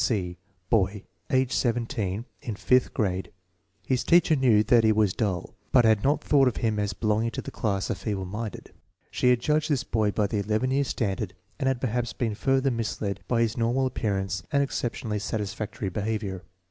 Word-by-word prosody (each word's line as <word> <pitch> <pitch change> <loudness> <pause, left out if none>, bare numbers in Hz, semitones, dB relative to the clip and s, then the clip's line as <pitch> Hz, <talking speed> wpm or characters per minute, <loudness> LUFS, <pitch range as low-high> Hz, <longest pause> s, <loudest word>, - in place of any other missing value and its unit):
7). 95 -7 0
C. - - -22 0.3
Boy, 100 -2 +2 0.3
age 130 -1 +2
17; 115 -4 -1 0.2
in 115 - -4
fifth 125 +4 +2
grade. 95 -4 -1 0.5
His 130 -1 +1
teacher 170 -2 +5
knew 120 -6 +4
that 115 +1 +4
he 110 - +5
was 105 -3 +2
dull, 95 -6 -2 0.2
but 125 -3 +5
had 110 -2 +4
not 145 +3 +2
thought 140 -3 +4
of 125 - 0
him 110 -2 0
as 105 -2 -1
belonging 110 +3 0
to - - -5
the - - -7
class 100 -3 -1
of - - -3
feeble 100 -4 -3
minded. 105 +3 -6 0.4
She 125 - +2
had 125 -1 +4
judged 150 +3 +1
this 140 -3 +1
boy 110 -6 +1
by 105 0 +1
the 100 +1 -1
11 110 +5 0
year 140 +1 +2
standard 100 -5 -2 0.2
and 135 - 0
had 130 -2 +1
perhaps 120 -1 -1
been 115 -3 -1
further 135 +4 +1
misled 105 -4 -2
by 115 -2 +2
his 115 0 0
normal 120 +3 +1
appearance 100 -6 -1
and 140 -1 +3
exceptionally 115 -5 -3
satisfactory 105 -1 -3
behavior. 100 -2 -3
110 Hz, 190 wpm, -26 LUFS, 105-125 Hz, 0.5 s, teacher